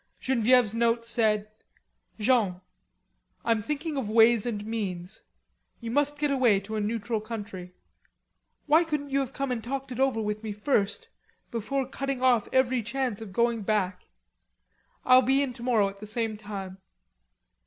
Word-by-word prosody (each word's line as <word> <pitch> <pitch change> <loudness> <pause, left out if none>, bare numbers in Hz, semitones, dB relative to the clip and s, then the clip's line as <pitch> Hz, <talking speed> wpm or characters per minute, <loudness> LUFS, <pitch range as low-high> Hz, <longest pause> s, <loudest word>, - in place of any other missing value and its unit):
Genevieve's 245 -3 +3
note 230 0 +1
said: 215 -3 +1 0.7
"Jean: 210 -6 +2 0.9
I'm 230 -2 +2
thinking 300 +5 -3
of 240 -6 -2
ways 225 +1 +5
and 210 -3 -3
means. 200 -4 -4 0.6
You 230 -1 -5
must 290 +2 +1
get 295 -1 0
away 245 -7 +4
to 215 +3 -6
a 215 - -1
neutral 220 +1 -2
country. 205 -5 -7 0.9
Why 315 +3 +5
couldn't 300 -3 -3
you 275 - +2
have 270 -2 -2 0.3
talked 270 +3 -5
it 250 - -5
over 265 -4 +2
with 210 -1 -2
me 220 -2 -4
first, 215 - 0 0.4
before 255 +4 -2
cutting 275 0 -3
off 245 -4 +4
every 260 -1 +2
chance 235 -1 -3
of 215 -3 -8
going 235 +2 +1
back. 195 -3 -1 1.0
I'll 255 0 +7
be 270 +2 +2
in 260 -3 -3
tomorrow 235 -4 +1
at 195 0 -13
the 210 - -8
same 220 0 -2
time. 195 -3 -7
230 Hz, 150 wpm, -27 LUFS, 210-260 Hz, 1.0 s, I'll